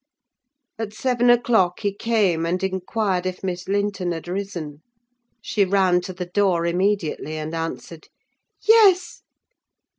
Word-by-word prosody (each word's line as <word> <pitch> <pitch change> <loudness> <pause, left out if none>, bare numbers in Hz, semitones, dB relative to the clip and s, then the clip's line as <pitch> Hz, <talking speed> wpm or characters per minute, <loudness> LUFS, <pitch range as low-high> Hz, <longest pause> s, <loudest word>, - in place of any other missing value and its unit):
At 215 -2 -4
seven 245 0 +1
o'clock 230 -7 +3
he 205 -2 -1
came, 205 -6 +1
and 180 +3 -1
inquired 190 0 -1
if 185 +1 -6
Miss 180 -1 -4
Linton 200 -3 -1
had 165 +1 -7
risen. 175 -6 -5 0.6
She 205 - +1
ran 185 -2 +2
to 180 - -6
the 180 0 -6
door 180 -2 +1
immediately, 170 -3 -1
and 155 +1 -5
answered, 165 0 -6 0.5
"Yes." 420 -5 +4
190 Hz, 125 wpm, -22 LUFS, 175-205 Hz, 0.6 s, Yes